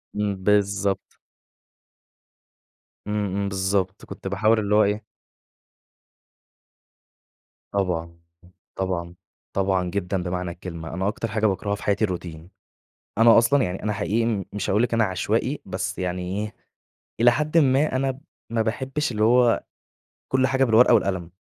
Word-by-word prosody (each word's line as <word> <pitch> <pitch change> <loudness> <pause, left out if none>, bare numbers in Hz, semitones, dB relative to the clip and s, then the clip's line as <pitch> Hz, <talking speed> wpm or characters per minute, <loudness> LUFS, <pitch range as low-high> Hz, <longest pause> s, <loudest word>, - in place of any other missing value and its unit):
إمم، 105 -1 -1
بالضبط. 100 -1 +1 1.9
إمم، 105 -2 -1
إمم 100 0 -1
بالضبط، 95 0 -1
كنت - - -8
باحاول 110 +3 +2
اللي 105 0 +1
هو 110 - +6
إيه 105 +2 0 2.7
طبعًا، 85 -4 -2 0.6
طبعًا، 90 -2 -3 0.4
طبعًا 95 -2 +1
جدًا 95 -1 -2
بمعنى 90 -1 -3
الكلمة. 85 -2 -8
أنا 95 +2 -1
أكتر 115 +2 -2
حاجة 110 0 -1
باكرهها 100 +1 -1
في 105 - -11
حياتي 100 +1 +1
الروتين. 85 -3 -6 0.7
أنا 115 0 +7
أصلًا 130 +4 +4
يعني، 90 +1 -4
أنا 105 0 0
حقيقي 110 -1 0
مش 105 -1 -3
هاقول 105 +4 +3
لكِ 120 - -1
أنا 115 - +3
عشوائي 95 -3 -1
بس - - -4
يعني 90 0 -2 0.2
إيه، 105 0 -5 0.7
إلى 120 +1 +7
حدٍ 150 +5 0
ما 140 -1 +3
أنا 135 0 -1 0.3
ما 115 - +1
باحبش 130 +6 -2
اللي 110 -1 0
هو 120 +1 +4 0.7
كل 130 0 +2
حاجة 130 +1 +2
بالورقة 120 0 +5
والقلم. 95 -6 +1
100 Hz, 135 wpm, -24 LUFS, 95-115 Hz, 2.7 s, أنا